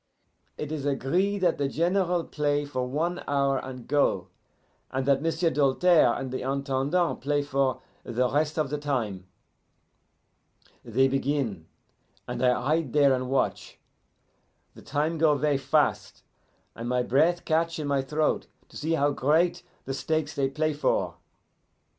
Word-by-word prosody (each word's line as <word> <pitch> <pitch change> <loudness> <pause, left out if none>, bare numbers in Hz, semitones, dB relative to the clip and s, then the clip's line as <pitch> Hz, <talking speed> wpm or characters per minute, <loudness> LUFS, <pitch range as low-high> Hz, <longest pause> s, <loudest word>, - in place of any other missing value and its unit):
It 150 0 -5
is 155 -3 -3
agree 165 +9 0
that 180 -5 +1
the 140 - +1
General 175 +3 +1
play 145 -1 -1
for 130 -3 -3
one 165 +7 -2
hour 140 -1 +1
and 130 -2 -8
go, 145 0 +1 0.6
and 130 0 -2
that 140 0 +3
M'sieu' 165 +1 +1
Doltaire 150 -1 +3
and 130 -1 -5
the 130 - -3
Intendant 140 +5 0
play 145 +1 0
for 135 -2 0 0.2
the 125 +1 0
rest 150 +4 0
of 150 -3 0
the 150 - -2
time. 110 -11 -3 1.6
"They 125 +3 +2
begin, 135 - -1 0.6
and 120 - -3
I 125 -1 +3
hide 155 -2 0
there 140 -2 +5
and 130 -1 -2
watch. 135 0 -1 1.0
The - - -14
time 155 +3 -1
go 155 -2 +4
ver' 145 -1 +1
fast, 135 - 0 0.5
and 115 +1 -6
my 125 0 +1
breath 160 +8 +2
catch 165 +1 +1
in 155 - -4
my 140 -1 +1
throat 150 +3 -1 0.2
to - - -11
see 160 +2 -1
how 145 -2 +2
great 155 +6 +2 0.2
the 135 - -3
stakes 155 +2 -1
they 135 -1 0
play 155 +2 -1
for. 145 - 0
145 Hz, 150 wpm, -27 LUFS, 135-155 Hz, 1.6 s, there